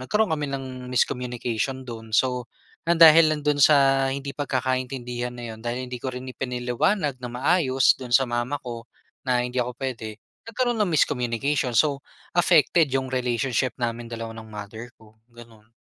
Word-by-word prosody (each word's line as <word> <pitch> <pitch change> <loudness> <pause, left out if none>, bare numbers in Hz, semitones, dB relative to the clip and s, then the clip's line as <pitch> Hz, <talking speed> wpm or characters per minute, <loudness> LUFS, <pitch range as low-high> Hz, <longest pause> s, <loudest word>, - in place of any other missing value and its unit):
nagkaroon 210 +9 0
kami 150 -1 -3
ng 130 -2 -6
miscommunication 125 +1 -1
do'n. 115 -2 -9
So, 125 -2 +1 0.4
nang 170 0 +2
dahil 160 0 +9
lang 150 -1 -3
do'n 145 -1 +1
sa 135 -2 +5
hindi 140 0 -4
pagkakaintindihan 130 -3 -2
na 120 -1 -8
'yon, - - -14
dahil 125 +2 -3
hindi 125 -1 -6
ko 130 0 -4
rin 125 +1 -7
ipinaliwanag 125 - -1
nang 125 -1 -7
maayos 135 -3 +3
do'n 125 -2 -4
sa 135 +2 +6
mama 120 +4 -2
ko 120 -1 -7 0.4
na 125 -1 +2
hindi 125 +1 -3
ako 125 0 -3
puwede, 115 -5 -5 0.3
nagkaroon 240 0 -1
ng 195 -5 +1
miscommunication. 125 -1 0
So, 145 +2 +3 0.4
affected 170 -2 +4
'yong 130 -1 -1
relationship 125 0 0
namin 120 0 -2
dalawa 115 -1 -6
ng 110 - -10
mother 105 +2 -8
ko, 110 0 -21 0.2
gano'n. 115 -2 -16
125 Hz, 165 wpm, -24 LUFS, 120-140 Hz, 0.4 s, dahil